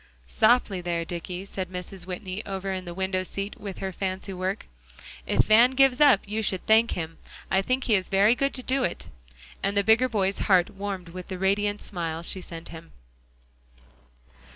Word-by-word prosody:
"Softly 185 Hz, -, +2 dB
there, 170 Hz, -1 st, -2 dB
Dicky," 175 Hz, +2 st, -5 dB
said 190 Hz, -2 st, -5 dB
Mrs. 180 Hz, 0 st, -7 dB
Whitney, 185 Hz, +2 st, -5 dB
over 195 Hz, -1 st, -4 dB
in 185 Hz, -1 st, -4 dB
the 175 Hz, -, -6 dB
window 190 Hz, 0 st, -1 dB
seat 195 Hz, +2 st, -5 dB
with 200 Hz, -2 st, -6 dB
her 190 Hz, 0 st, -4 dB
fancy 190 Hz, +1 st, -4 dB
work; 185 Hz, +3 st, -3 dB, 0.6 s
"if -, -, +3 dB
Van 230 Hz, +3 st, +6 dB
gives 270 Hz, 0 st, +4 dB
up, 275 Hz, -9 st, +7 dB
you 215 Hz, +2 st, -2 dB
should 190 Hz, -3 st, -1 dB
thank 225 Hz, +1 st, +4 dB
him; 165 Hz, -1 st, -5 dB, 0.3 s
I 190 Hz, -, +4 dB
think 255 Hz, +6 st, -1 dB
he 225 Hz, -, +1 dB
is 190 Hz, -3 st, +1 dB
very 200 Hz, +3 st, +5 dB
good 275 Hz, +2 st, -1 dB
to 255 Hz, -, -3 dB
do 265 Hz, +1 st, 0 dB
it." -, -, -2 dB, 0.6 s
And 200 Hz, +1 st, -1 dB
the 200 Hz, -, +4 dB
bigger 225 Hz, +5 st, +4 dB
boy's 200 Hz, -4 st, 0 dB
heart 180 Hz, -3 st, +4 dB
warmed 195 Hz, -3 st, -5 dB
with 180 Hz, +1 st, -8 dB
the 185 Hz, -, -5 dB
radiant 205 Hz, +2 st, 0 dB
smile 165 Hz, -3 st, -3 dB
she 185 Hz, +2 st, -2 dB
sent 165 Hz, -2 st, -9 dB
him. 165 Hz, 0 st, -11 dB
195 Hz, 185 wpm, -26 LUFS, 180-210 Hz, 0.6 s, up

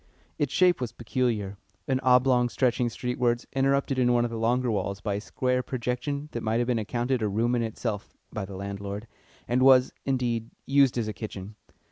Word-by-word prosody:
Its 145 Hz, -3 st, 0 dB
shape 180 Hz, -5 st, +3 dB
was 125 Hz, -, -2 dB
peculiar 110 Hz, -5 st, -2 dB, 0.3 s
an 130 Hz, -2 st, +1 dB
oblong 125 Hz, -1 st, +4 dB
stretching 125 Hz, -1 st, +1 dB
streetwards, 120 Hz, +3 st, -1 dB
interrupted 135 Hz, 0 st, +1 dB
in 125 Hz, -1 st, +3 dB
one 120 Hz, -1 st, +3 dB
of 120 Hz, -, -4 dB
the 115 Hz, -, -4 dB
longer 120 Hz, +2 st, +1 dB
walls 100 Hz, -1 st, -2 dB
by 105 Hz, -1 st, -2 dB
a 100 Hz, -, -2 dB
square 125 Hz, +3 st, 0 dB
projection 125 Hz, +4 st, -3 dB
that 120 Hz, -, -4 dB
might 110 Hz, +1 st, 0 dB
have 120 Hz, -, +1 dB
been 120 Hz, -2 st, +1 dB
accounted 120 Hz, +3 st, -1 dB
a 110 Hz, -, +1 dB
room 115 Hz, +4 st, +1 dB
in 120 Hz, -, +1 dB
itself 110 Hz, -2 st, -4 dB, 0.2 s
(by 110 Hz, -, -3 dB
the 95 Hz, 0 st, -7 dB
landlord), 100 Hz, +2 st, -5 dB, 0.4 s
and 125 Hz, +2 st, +1 dB
was, 130 Hz, -1 st, +6 dB
indeed, 120 Hz, -4 st, -1 dB, 0.2 s
used 135 Hz, -2 st, +4 dB
as 115 Hz, -2 st, 0 dB
a 110 Hz, -, -3 dB
kitchen. 105 Hz, -1 st, -7 dB
120 Hz, 190 wpm, -27 LUFS, 110-130 Hz, 0.4 s, was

